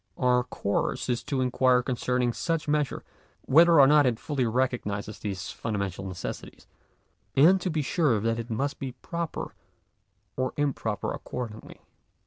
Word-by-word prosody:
Our 125 -1 +3
course 100 +2 -2
is 120 -1 0
to 135 -2 -1
inquire 125 0 +3
concerning 125 -1 0
such 165 +5 -2
measure, 150 -1 0 0.4
whether 165 +3 +6
or 140 - +9
not 145 0 +5
it 120 -2 0
fully 135 -5 -1
recognises 110 -4 -2
these 100 -2 -4
fundamental 100 -4 -4
necessities, 90 -2 -7 0.7
and 180 +7 +6
to 185 - -1
be 155 -3 -1
sure 145 - +2
that 115 +2 -1
it 115 +1 -6
must 135 +6 -2
be 135 -3 -5
proper 170 +6 -5 0.8
or 130 0 -1
improper 125 -8 -1
accordingly. 115 -3 -7
125 Hz, 140 wpm, -27 LUFS, 115-145 Hz, 0.8 s, or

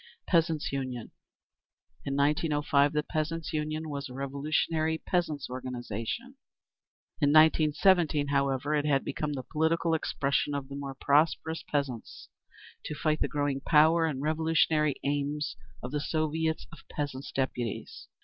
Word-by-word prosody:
Peasants' 165 -3 +1
Union. 130 -4 -4 0.9
In 140 - -2
1905, 145 0 +2
the 150 0 +1
Peasants' 160 +1 -3
Union 155 +1 -2
was 140 -2 -5
a 125 - -9
revolutionary 155 +4 0
peasants' 160 -6 -1
organisation. 125 - -5 0.8
In 145 - +4
1917, 155 0 +4
however, 140 +1 +1
it 150 0 +1
had 135 -2 +2
become 150 -1 -2
the 130 -2 -4
political 160 +2 +1
expression 145 -2 0
of 140 -1 -4
the 140 - -6
more 140 -1 -5
prosperous 160 +2 +2
peasants, 140 -6 -3 0.6
to 150 - -4
fight 155 0 0
the - - +2
growing 145 -2 -1
power 160 +2 +5
and 140 -3 -3
revolutionary 155 -1 +2
aims 145 +1 -1 0.3
of 125 - -5
the 150 - -1
Soviets 160 +1 -1
of 165 - -12
Peasants' 145 -2 -4
Deputies. 125 -4 -3
150 Hz, 130 wpm, -29 LUFS, 140-160 Hz, 0.9 s, power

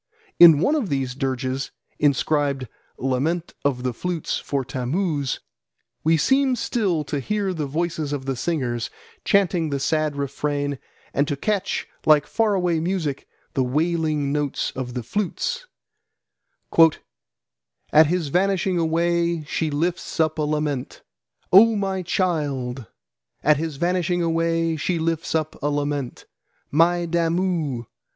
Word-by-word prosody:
In 165 -3 +10
one 285 - +3
of 280 - 0
these 135 -3 -1
dirges, 130 0 -2 0.3
inscribed 140 -1 +1 0.3
Lament 145 +7 -1
of 130 -3 0
the 125 -1 -1
Flutes 175 +5 -2
for 140 -2 -2
Tammuz, 145 +2 -2 0.6
we 160 +1 +4
seem 265 - +3
still 200 -9 0
to 145 0 -3
hear 200 +6 -1
the 155 -4 -3
voices 155 0 -2
of 140 -2 -3
the 135 -1 -1
singers 120 -5 -2 0.3
chanting 180 -5 +2
the 140 -1 -1
sad 155 +1 0
refrain 145 0 -2 0.3
and 140 +1 +1
to 145 - -1
catch, 205 +5 -1 0.2
like 150 -1 +6
far 215 +4 +1
away 175 -3 +1
music, 165 -5 -2 0.3
the 130 - +1
wailing 155 +1 0
notes 145 -1 -1
of 125 -1 -5
the 125 - -3
flutes: 205 - -2 2.3
"At 155 0 +7
his 170 -2 -1
vanishing 185 +1 +1
away 170 0 +1
she 155 +1 -2
lifts 170 +6 -2
up 155 -1 +1
a - - +2
lament, 150 -3 -2 0.5
'Oh 225 +4 +8
my 195 -2 -1
child!' 140 - -1 0.6
at 150 0 +5
his 160 -1 -3
vanishing 175 +2 0
away 165 0 +1
she 170 +4 -1
lifts 165 +1 -1
up 155 0 -2
a 145 - 0
lament; 145 -3 -2 0.5
'My 170 +3 +3
Damu!' 165 -6 0
155 Hz, 130 wpm, -23 LUFS, 140-175 Hz, 2.3 s, In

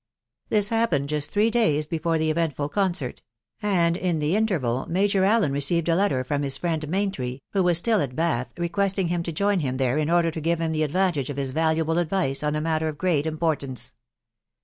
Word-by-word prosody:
This 205 -1 +3
happened 225 -12 +1
just 150 -1 -1
three 215 +2 +2
days 155 -11 +2
lpefore 165 +1 -1
the 160 0 +1
eventful 155 -3 -1
concert; 180 -7 -1 0.4
and 175 -5 +2
in 180 -2 -1
the 150 +4 0
interval 155 - 0
Major 195 +2 +2
Allen 205 -5 +3
received 150 +4 +1
a 165 - +3
letter 170 -9 +1
from 145 +2 -2
his 140 -1 0
friend 160 -3 -2
Maintry, 145 -9 -2
who 195 - +2
was 175 -2 +3
still 220 +3 +2
at 130 -3 -3
vBath, 160 -6 0
requesting 185 +1 0
him 175 0 0
to 170 - -4
join 200 +4 +1
him 130 -4 -2
there 130 +2 +1
in 155 0 0
order 170 -1 +3
to 160 - -6
give 165 +1 0
him 165 -1 -1
the 155 -1 -1
advantage 155 -3 0
of 140 - -5
his 135 -2 -1
valuable 160 +2 +1
advice 170 -5 0
on 150 0 -1
a 150 - -1
matter 160 0 0
of 155 -2 -4
great 160 -4 +1
importance. 140 -6 -2
160 Hz, 205 wpm, -24 LUFS, 145-185 Hz, 0.4 s, This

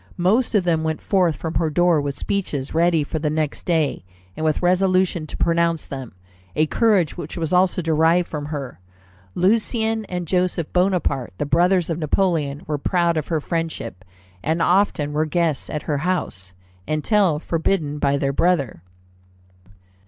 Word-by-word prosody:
Most 215 +8 +2
of 200 - +4
them 165 -2 +1
went 160 -1 -1
forth 180 -5 +1
from 160 +4 -5
her 160 -1 +1
door 175 0 +3
with 140 -1 -4
speeches 155 -9 -3
ready 165 -1 +3
for 155 +2 -4
the 150 0 -1
next 155 +2 -3
day, 160 - 0 0.3
and - - -5
with 155 +2 0
resolution 185 -2 +2
to - - -8
pronounce 170 -1 +1
them 135 -7 -8 0.4
a 155 - +3
courage 190 -1 +2
which 170 -1 -7
was 165 0 -2
also 180 0 +2
derived 165 +2 +3
from 150 -2 -5
her." 140 - -6 0.6
Lucien 220 +3 +1
and 180 -2 -4
Joseph 180 -2 -1
Bonaparte, 180 - 0
the - - -2
brothers 175 +3 +2
of 165 - -2
Napoleon, 155 -3 0
were 150 -2 -2
proud 170 +2 +1
of 155 -2 -2
her 160 -2 0
friendship, 155 - -4 0.4
and 160 - -1
often 175 -5 +2
were 155 +1 +1
guests 160 -2 0
at 150 - -4
her 145 -2 -1
house, 140 - -3 0.3
until 165 +2 +2
forbidden 160 -2 -1
by 140 -1 +2
their 140 0 -1
brother. 140 - +1
165 Hz, 160 wpm, -22 LUFS, 150-180 Hz, 0.6 s, of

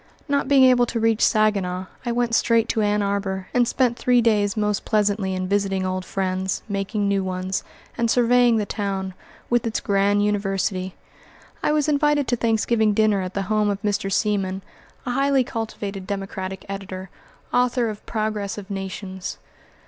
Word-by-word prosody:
Not 280 -2 0
being 275 -1 +5
able 250 -2 +5
to 230 - -2
reach 225 0 +2
Saginaw, 195 -4 +2 0.2
I - - +1
went 240 -1 0
straight 230 0 +3
to 220 - +1
Ann 210 0 +1
Arbor, 195 -2 -2
and 245 -1 +3
spent 245 -1 +1
three 250 -1 +3
days 210 -3 +2
most 210 -1 0
pleasantly 205 -3 +1
in 185 0 -2
visiting 195 -1 0
old 185 0 -2
friends, 190 -1 -2
making 200 0 -1
new 200 -1 +1
ones, 185 0 -2 0.4
and 235 -1 +2
surveying 245 0 +4
the 210 - 0
town, 195 -2 -3 0.4
with 240 0 +2
its 225 - -1
grand 200 0 +2
University. 195 -2 -1 0.7
I - - +1
was 300 -1 +1
invited 295 -2 +2
to 245 - +3
Thanksgiving 220 -2 +1
dinner 215 -2 +3
at 185 0 -5
the 200 - 0
home 210 +1 +1
of 200 -1 -1
Mr. 200 -1 -1
Seaman, 195 -2 0 0.4
a 250 - -2
highly 275 +1 +2
cultivated 205 -5 -5
Democratic 190 -1 -5
editor, 190 -1 -6 0.4
author 245 -1 +2
of 210 -2 -6
"Progress 215 -3 -2
of 205 0 -8
Nations." 190 -1 -5
205 Hz, 165 wpm, -23 LUFS, 195-230 Hz, 0.7 s, being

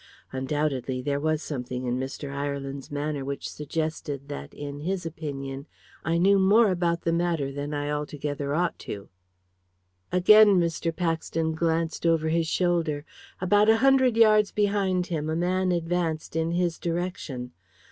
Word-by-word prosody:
Undoubtedly, 135 -1 -1
there 140 +2 -1
was 155 +1 0
something 125 -3 -4
in 125 +1 -1
Mr. 135 +2 -5
Ireland's 140 -1 -4
manner 145 -1 -3
which 140 +1 -4
suggested 150 -2 -4
that, 145 - -6
in 145 0 -7
his 180 +3 -3
opinion, 140 -3 -5 0.4
I 165 +1 +1
knew 195 +3 +4
more 205 +3 +5
about 170 -2 0
the 165 - +1
matter 170 -5 0
than 145 +1 -4
I 145 0 -2
altogether 145 -1 -3
ought 175 +1 0
to." 100 -1 -7 1.0
Again 205 +2 +7
Mr. 170 0 0
Paxton 165 -1 -1
glanced 165 0 0
over 160 -1 +2
his 165 0 +1
shoulder. 165 -4 0 0.3
About 205 +3 +4
a 225 - +6
hundred 260 -2 +4
yards 215 -2 +5
behind 200 -3 +1
him 155 -3 -3
a 160 - 0
man 185 +2 +1
advanced 165 -2 -1
in 165 0 +1
his 175 -1 0
direction. 165 -8 -3
160 Hz, 145 wpm, -26 LUFS, 145-180 Hz, 1.0 s, Again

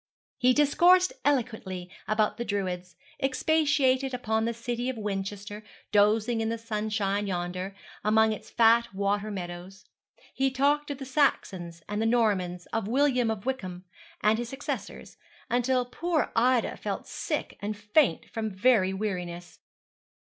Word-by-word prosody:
He 250 +1 +5
discoursed 350 +6 +5
eloquently 220 -10 -1 0.2
about 215 0 +1
the 235 - -2
Druids, 185 -4 -3 0.3
expatiated 270 -2 +2
upon 220 -2 0
the 230 - 0
City 240 +1 -3
of 260 - -4
Winchester, 205 0 -4 0.3
dozing 215 +3 +3
in 220 - 0
the 230 - -2
sunshine 210 -2 -1
yonder, 185 +1 -3 0.3
among 220 +1 +4
its 215 - -9
fat 230 -1 +4
water 200 +1 0
meadows. 185 0 -7 0.5
He 270 0 +1
talked 285 +3 +1
of 285 - -3
the 270 - -7
Saxons 185 - 0
and 210 +1 -2
the 225 - +2
Normans, 195 -7 +1
of 225 -3 -1
William 250 -1 +2
of 220 -1 -3
Wykeham, 185 -9 -4 0.4
and 215 +2 +3
his 240 -1 -4
successors, 270 - -6 0.3
until 250 +1 +2
poor 315 +6 -1
Ida 245 +1 +2
felt - - -4
sick - - -4
and 205 +1 -3
faint 210 - +2
from 225 -1 -3
very 190 -1 +3
weariness. 180 -4 -4
220 Hz, 140 wpm, -28 LUFS, 195-255 Hz, 0.5 s, He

